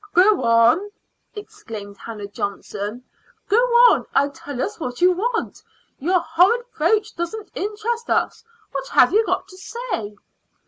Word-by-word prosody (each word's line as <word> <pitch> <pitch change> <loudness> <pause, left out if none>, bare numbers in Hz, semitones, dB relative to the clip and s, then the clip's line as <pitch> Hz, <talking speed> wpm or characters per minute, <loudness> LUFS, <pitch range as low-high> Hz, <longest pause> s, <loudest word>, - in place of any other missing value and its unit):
"Go 385 +3 +5
on," 230 - +4 0.5
exclaimed 230 - -9
Hannah 210 0 -8
Johnson 205 +3 -5 0.4
"go 430 0 +3 0.3
on - - +1
and 280 0 +2
tell 280 -2 -8
us 415 +9 -3
what 250 -5 -5
you 360 +1 +5
want. 450 +6 -2 0.4
Your 355 +5 +2
horrid 365 +10 +3
brooch 435 0 +1
doesn't 385 +5 -5
interest 440 +4 -3
us. - - 0 0.3
What 270 -1 -4
have 250 - +4
you 440 +2 +5
got - - -1
to 370 - -14
say?" 380 - -5
355 Hz, 140 wpm, -21 LUFS, -, 0.5 s, Go